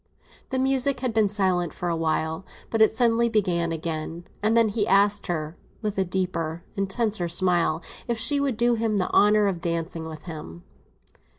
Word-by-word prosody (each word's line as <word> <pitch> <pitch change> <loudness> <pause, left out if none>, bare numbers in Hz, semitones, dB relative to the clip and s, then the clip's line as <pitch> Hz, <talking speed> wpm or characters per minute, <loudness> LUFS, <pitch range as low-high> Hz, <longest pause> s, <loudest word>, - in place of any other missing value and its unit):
The 260 - -1
music 265 0 +1
had 255 -3 -1
been 220 -2 +3
silent 185 -5 0
for 175 - -4
a 170 - 0
while, 160 +1 -1 0.3
but 225 - +1
it 220 0 +5
suddenly 235 -1 +3
began 180 -6 +1
again; 165 +1 -4 0.2
and 220 +2 +2
then 230 -2 +4
he 210 0 0
asked 200 +1 +3
her, 155 -2 -3 0.3
with 210 -1 -2
a - - +3
deeper, 175 -3 -3
intenser 195 -1 -1
smile, 170 -2 +1 0.2
if 235 -1 -1
she 280 +6 +3
would 275 -5 0
do 240 +1 +3
him 225 -2 0
the 185 - -1
honour 210 0 +5
of 185 -4 -1
dancing 165 -1 -3
with 155 -2 -9
him. 150 - -8
195 Hz, 180 wpm, -25 LUFS, 170-225 Hz, 0.3 s, it